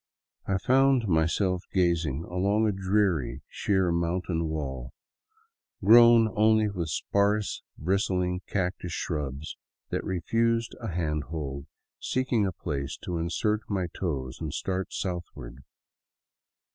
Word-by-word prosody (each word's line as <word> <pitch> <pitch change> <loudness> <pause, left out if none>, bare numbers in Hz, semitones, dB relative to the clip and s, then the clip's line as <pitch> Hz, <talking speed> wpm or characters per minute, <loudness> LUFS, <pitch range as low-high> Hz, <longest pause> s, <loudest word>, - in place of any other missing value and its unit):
I 100 - +1
found 130 +1 +3
myself 90 +2 +1
gazing 85 -5 +1
along 100 +5 +1
a - - +2
dreary, 95 -9 0
sheer 95 -3 +1
mountain 85 0 -1
wall, 65 -5 -4 0.9
grown 115 +1 +8
only 110 0 +4
with 85 -5 -3
sparse, 100 +5 0 0.2
bristling 90 +1 0
cactus 90 -3 -2
shrubs 75 0 -4 0.3
that - - -1
refused 115 +6 0
a 115 - -5
hand 80 -5 -2
hold, 70 -4 -5 0.3
seek 130 0 -2
ing 105 -4 +3
a - - -1
place 70 -6 -4
to 85 -2 -3
insert 105 +6 0
my 95 -3 0
toes 65 -8 -3
and 80 -3 -4
start 95 0 -2
southward. 85 -10 -5
90 Hz, 120 wpm, -27 LUFS, 80-105 Hz, 0.9 s, grown